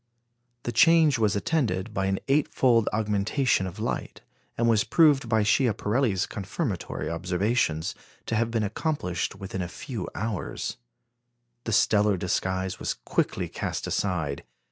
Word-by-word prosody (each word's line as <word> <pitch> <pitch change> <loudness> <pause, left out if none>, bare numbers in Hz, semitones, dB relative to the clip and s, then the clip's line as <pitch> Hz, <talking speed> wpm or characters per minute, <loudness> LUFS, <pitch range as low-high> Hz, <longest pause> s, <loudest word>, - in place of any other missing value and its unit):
The 120 - -2
change 160 0 +5
was 105 -3 +2
attended 100 - -1
by 95 0 0
an 95 0 +1
eight 140 +2 +3
fold 115 -4 +3
augmentation 105 +1 +1
of 90 - -8
light, - - -4 0.4
and 115 - +2
was 115 -2 +4
proved 145 -7 +4
by 110 -2 +3
Schiaparelli's 110 -2 +1
confirmatory 100 - -4
observations 90 0 0 0.3
to 115 - -2
have 115 +1 +1
been 115 -2 0
accomplished 100 - -2
within 95 -1 -5
a 90 - -2
few 100 +2 -6
hours. 110 - -3 0.9
The 115 - -2
stellar 105 -2 +3
disguise 95 +1 -1
was - - -2
quickly - - -1
cast - - -4
aside. 80 -8 -1
105 Hz, 135 wpm, -26 LUFS, 95-120 Hz, 0.9 s, change